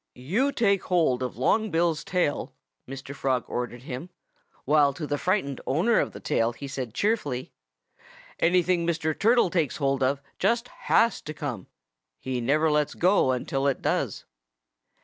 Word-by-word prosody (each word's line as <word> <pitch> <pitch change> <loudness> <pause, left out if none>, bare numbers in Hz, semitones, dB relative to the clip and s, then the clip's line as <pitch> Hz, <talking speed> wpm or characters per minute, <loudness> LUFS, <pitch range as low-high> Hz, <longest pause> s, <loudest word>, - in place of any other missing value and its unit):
"You 200 - 0
take 200 -7 +1
hold 160 -9 +2
of 125 -3 -4
Long 215 - +2
Bill's 165 -2 +1
tail," 180 -5 -1 0.3
Mr. 135 +1 -7
Frog 130 -3 -1
ordered 120 0 -4
him, 130 +6 -6 0.6
while 145 0 +4
to 155 +3 -5
the 145 -1 -2
frightened 175 -8 -1
owner 175 - +3
of - - -1
the - - -10
tail 115 +1 0
he 140 +4 -8
said 130 -4 -5
cheerfully, 150 - -1 0.9
"Anything 175 0 +2
Mr. 160 -2 0
Turtle 225 -3 +3
takes 165 -6 0
hold 135 -2 0
of 135 +2 +1 0.2
just 230 +5 +1 0.2
has 230 +1 +4
to 155 - -7
come. 125 - -5 0.5
He 130 -2 -3
never 150 +6 +2
lets 150 0 +1
go 180 -5 +3
until 135 +2 -1
it 135 - -1
does." - - -1
150 Hz, 155 wpm, -26 LUFS, 130-180 Hz, 0.9 s, while